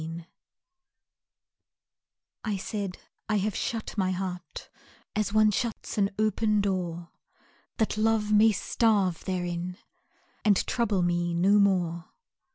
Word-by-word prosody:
IV 165 +1 -6 2.2
I 210 -3 -1
said, 195 -1 -4 0.3
"I 215 - +2
have 210 +1 0
shut 225 -2 -3
my 185 -1 +2
heart 185 -1 -5 0.5
As 210 -1 0
one 215 0 +5
shuts 230 +2 -3
an 195 -1 +3
open 215 0 +2
door, 175 -4 -2 0.7
That 220 -2 0
Love 215 -1 +2
may 215 +1 +6
starve 200 -4 +1
therein 180 -1 -3 0.7
And 205 -3 +3
trouble 210 -6 +1
me 175 0 0
no 195 +4 +4
more." 175 -4 +1
195 Hz, 115 wpm, -28 LUFS, 180-215 Hz, 2.2 s, may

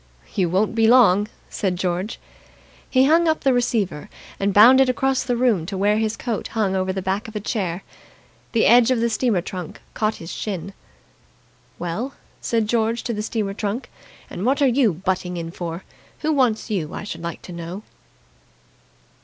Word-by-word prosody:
"You 180 -3 +1
won't 195 +5 +1
be 225 -1 +3
long!" 210 -5 +5 0.2
said 190 -3 -2
George. 180 +3 -2 0.7
He 260 0 +4
hung 330 +4 +4
up 315 0 +1
the 270 -2 +3
receiver, 220 - -1 0.3
and 200 +1 +1
bounded 255 +6 +7
across 265 +1 +1
the 245 -1 -1
room 225 -10 +2
to 195 -1 -4
where 205 +2 +2
his 220 0 -1
coat 235 -5 -3
hung 195 -3 +1
over 190 0 0
the 190 0 -4
back 195 +5 -2
of 220 - -11
a - - -1
chair. 190 -4 -3 0.7
The 230 - +3
edge 240 +1 +6
of 255 -2 +2
the 235 0 +1
steamer 220 -4 +1
trunk 180 -2 -7
caught 215 0 0
his 165 - -9
shin. 195 -2 -5 1.0
"Well," 210 +11 -4 0.3
said 225 -2 0
George 230 +1 0
to 235 - -2
the 210 - -3
steamer 210 -2 -2
trunk, 210 +4 -4 0.4
"and 180 - -6
what 265 +5 +2
are 285 - +4
you 250 -3 +3
butting 180 +1 -2
in 165 -1 -5
for? 170 0 -6 0.4
Who 315 0 +1
wants 240 -5 +1
you, 170 -6 -2
I - - -5
should 170 -5 -6
like 170 0 -6
to 180 - -9
know!" 170 +4 -7
210 Hz, 180 wpm, -22 LUFS, 185-240 Hz, 1.0 s, bounded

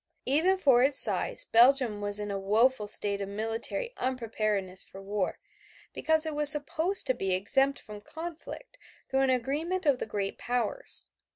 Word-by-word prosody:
Even 325 +8 +1
for 270 -9 +3
its 270 +1 +2
size, - - +4
Belgium 240 - +2
was 205 0 +3
in 205 -1 -5
a 195 - -4
woeful 215 +3 0
state 200 -1 +4
of 200 - -6
military 225 - -4
unpreparedness 215 -7 -3
for 195 - -14
war, 195 -1 -4 0.6
because 315 0 +1
it 315 - -4
was 295 0 +7
supposed 320 +6 +1
to 260 - 0
be 195 -6 -2
exempt 270 +9 0
from 210 -1 -12
conflict 340 - -10 0.3
through 270 0 -1
an 270 - +1
agreement 295 +9 -3
of 280 -4 +1
the - - -5
great 200 -2 -5
powers. 245 - -3
250 Hz, 165 wpm, -27 LUFS, 205-295 Hz, 0.6 s, was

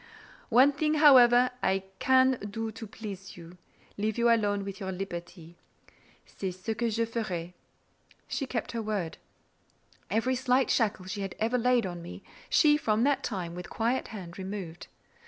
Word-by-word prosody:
One 255 +4 +6
thing, 305 +2 0
however, 250 -4 +7
I 190 0 +1 0.2
can 260 -1 +4
do 225 +2 -4
to 225 +1 -9
please 200 -3 -9
you—leave 180 +5 -7
you 235 0 +4
alone 205 -3 +1
with 195 -1 -7
your 190 -1 -4
liberty: 175 -2 -7 0.7
c'est 190 - -5
ce 190 +5 -3
que 235 +1 -1
je 230 +1 0
ferai." 185 -7 -4 0.7
She 275 - -3
kept 235 -3 -3
her 230 - -3
word. 205 -6 -3 0.9
Every 225 +6 +1
slight 255 0 +2
shackle 210 -5 +1
she 195 +2 -5
had 195 -2 -5
ever 230 +3 0
laid 245 -1 +2
on 175 -2 -5
me, 170 - -9 0.3
she, 295 -2 +5
from 220 -5 +1
that 285 +1 +2
time, 180 -6 -4
with 180 0 -8
quiet 235 +3 -1
hand 185 -5 -9
removed. 185 -3 -6
215 Hz, 155 wpm, -29 LUFS, 190-245 Hz, 0.9 s, however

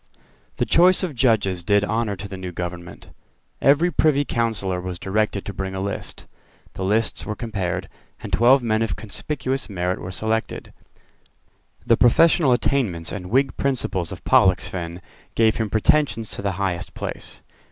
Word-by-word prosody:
The 125 - 0
choice 180 - +4
of 175 -5 -2
judges 110 -8 +1
did 100 +2 +3
honour 110 -1 -1
to 100 +2 -7
the 95 - -7
new 95 -1 -6
government. 85 0 -7 0.5
Every 150 +6 +4
Privy 145 -4 +2
Councillor 105 -7 -1
was 90 -1 -5
directed 100 +1 -1
to 105 - -5
bring 95 0 -4
a - - -3
list. 100 +1 -5 0.5
The 95 - -5
lists 110 +4 +1
were 105 - -4
compared; 100 -7 -3 0.3
and - - -8
twelve 125 +3 +5
men 110 -1 +1
of 110 -5 -1
conspicuous 130 +5 -4
merit 90 -1 -2
were 90 - -6
selected. 110 +4 -3 1.1
The 115 - +4
professional 150 +3 +4
attainments 115 -10 0
and 90 -3 -6
Whig 135 +3 +2
principles 110 -10 -1
of - - -8
Pollexfen 85 -1 +2 0.3
gave 110 -1 +3
him 110 -2 -1
pretensions 110 0 +1
to - - -5
the 100 -1 -1
highest 90 -3 -3
place. - - -6
105 Hz, 155 wpm, -22 LUFS, 95-120 Hz, 1.1 s, twelve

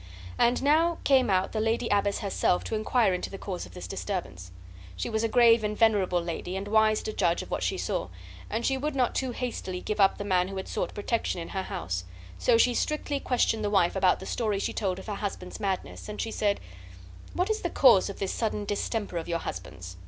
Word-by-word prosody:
And 240 +2 +3
now 320 +4 +3
came 265 -4 +4
out 190 -1 +2
the 220 - -2
lady 225 +2 0
abbess 200 0 +1
herself 190 -2 +1
to - - -5
inquire 215 -1 +2
into 180 - -3
the 195 - -7
cause 190 -2 -5
of - - -16
this 180 - -7
disturbance. 175 - -5 0.5
She 90 - -3
was 220 0 0
a - - +3
grave 230 -1 +5
and 210 0 -2
venerable 205 -6 +3
lady, 175 +2 -4
and 195 +1 -5
wise 215 0 +3
to 215 - -4
judge 175 -4 +1
of - - -13
what - - -1
she - - 0
saw, - - -2 0.4
and 225 +2 -2
she 270 - +2
would 295 +2 -2
not 250 -3 +1
too 260 - -1
hastily 235 -7 -4
give 210 +3 -4
up 195 -1 +5
the - - -4
man 185 -3 +2
who 195 0 -6
had 190 - -5
sought - - -3
protection 210 -3 -1
in 165 - -6
her 190 - -2
house; 90 - -4 0.4
so 95 - +4
she 245 +1 +4
strictly 295 +1 -1
questioned 235 -4 +1
the 205 - 0
wife 195 -4 +3
about 185 -1 +3
the - - -8
story 215 -4 -1
she 195 - -2
told 190 -4 -1
of 190 - -9
her 210 - -4
husband's 195 -3 -5
madness, 195 0 -3
and 210 - -6
she 225 - -2
said: 205 -2 0 0.8
"What 365 +4 +1
is 435 - -1
the 345 - -1
cause 235 - +5
of 200 - -7
this 195 - -2
sudden 210 -2 -2
distemper 205 -2 -2
of 165 - -4
your 170 -1 0
husband's? 90 - -7
205 Hz, 230 wpm, -28 LUFS, 185-230 Hz, 0.8 s, grave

